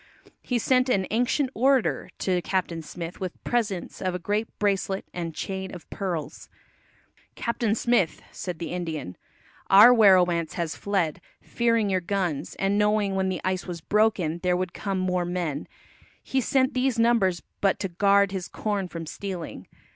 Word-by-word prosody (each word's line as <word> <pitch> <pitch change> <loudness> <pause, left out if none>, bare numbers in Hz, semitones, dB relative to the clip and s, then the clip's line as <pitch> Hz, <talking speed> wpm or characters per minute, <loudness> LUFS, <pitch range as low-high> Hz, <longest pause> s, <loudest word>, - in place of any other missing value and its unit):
He 250 - -1
sent 255 +2 +2
an 190 -6 +2
"ancient 250 +4 +1
orator" 265 0 +2
to 180 -2 0
Captain 175 -3 -2
Smith 165 +2 -7
with 185 -2 -6
presents 215 -7 -2
of 185 -1 -1
a - - 0
great 205 +5 -1
bracelet 195 -1 0
and 165 -3 -4
chain 190 -1 -4
of 175 - -10
pearls. 170 -7 -4 0.9
"Captain 235 -2 0
Smith," 230 -9 +1
said 180 -3 -5
the 170 - -5
Indian, 160 - -4 0.5
"our 210 +6 +9
werowance 180 -7 +4
has 170 -2 -3
fled, 190 -7 -1 0.2
fearing 230 -4 +1
your 185 -1 +1
guns, 175 -5 -2
and 195 +1 +1
knowing 210 -1 +2
when 190 0 0
the 185 -2 -3
ice 185 0 -1
was 175 -2 -5
broken 195 -4 +1
there 180 0 +1
would 185 -1 -3
come 195 -2 -3
more 180 -1 0
men; 175 -5 -3 0.6
he 265 - 0
sent 260 +2 +2
these 255 -1 +1
numbers 230 -7 +2 0.2
but 195 -1 +3
to 195 - -1
guard 200 +2 +3
his 190 -3 -4
corn 205 -3 -2
from 165 -2 -7
stealing. 180 0 -6
190 Hz, 160 wpm, -26 LUFS, 175-215 Hz, 0.9 s, our